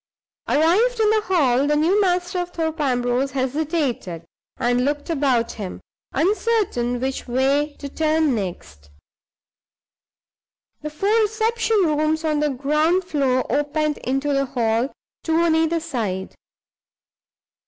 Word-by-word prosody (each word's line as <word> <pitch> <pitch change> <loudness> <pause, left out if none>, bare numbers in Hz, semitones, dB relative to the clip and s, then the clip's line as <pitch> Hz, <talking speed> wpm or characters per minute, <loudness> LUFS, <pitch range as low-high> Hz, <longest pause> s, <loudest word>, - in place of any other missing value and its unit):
Arrived 405 +11 +3
in 430 -1 +4
the 435 0 +2
hall, 280 -7 +2
the 295 - +2
new 345 +7 +3
master 360 -1 0
of 355 0 -3
Thorpe 325 -2 -3
Ambrose 250 0 0
hesitated, 265 - -2 0.3
and 245 +1 +1
looked 290 +4 -2
about 265 -6 +1
him, 200 -4 -7 0.3
uncertain 370 - 0
which 265 +2 -3
way 275 +4 +1
to 285 - -7
turn 310 0 +1
next. 75 - -6 1.9
The 305 - -4
four 390 +8 0
reception 445 +1 +1
rooms 310 +1 0
on 305 -1 +1
the 300 0 +1
ground 300 +7 +1
floor 275 -7 0
opened 295 +1 0
into 270 +3 -1
the 275 0 +1
hall, 235 -1 0 0.3
two 320 - 0
on 335 0 +3
either 325 +1 +2
side. 210 - -4
295 Hz, 125 wpm, -22 LUFS, 255-335 Hz, 1.9 s, in